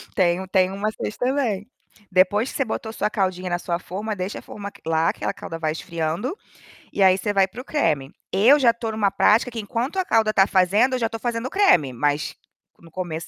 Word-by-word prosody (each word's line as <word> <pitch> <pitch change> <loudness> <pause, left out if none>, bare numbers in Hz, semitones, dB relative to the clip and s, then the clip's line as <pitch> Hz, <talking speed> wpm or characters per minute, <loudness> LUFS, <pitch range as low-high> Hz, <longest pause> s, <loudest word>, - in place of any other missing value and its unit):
Tem 175 -1 +2
um 190 - -8
tem 185 -1 +2
um 195 - -6
macete 215 +1 -3
também. 245 -6 -1 0.4
Depois 195 +6 +3
que - - -11
você 270 - 0
botou 220 0 -4
sua 210 -1 -1
caldinha 185 -3 -1
na 175 - 0
sua 170 -1 -2
forma, 210 +4 -5
deixa 185 +1 -4
a - - -12
forma 200 -1 -8
quela 165 -5 0
aquela - - -3
calda 165 - -7
vai 155 -1 0
esfriando, 170 - -3 0.5
e - - -3
aí 190 -1 +6
você 205 +2 -2
vai 195 -1 +4
para 235 +6 -9
o - - -15
creme. 150 - 0 0.2
Eu 235 +10 +5
já 245 -4 +5
estou 230 -1 -5
em - - -6
uma 205 -2 +1
prática 210 +5 +3
que 230 - -5
enquanto 235 - -3
a 375 - +1
calda 220 -6 +2
está 195 -2 +4
fazendo, 200 +8 +3
eu - - -2
já 230 - 0
estou 225 0 -6
fazendo 235 -1 -2
o - - -6
creme, 180 - +3
mas 145 +4 -1 0.4
no 165 -1 -17
começo 165 -2 -5
200 Hz, 230 wpm, -23 LUFS, 180-230 Hz, 0.5 s, aí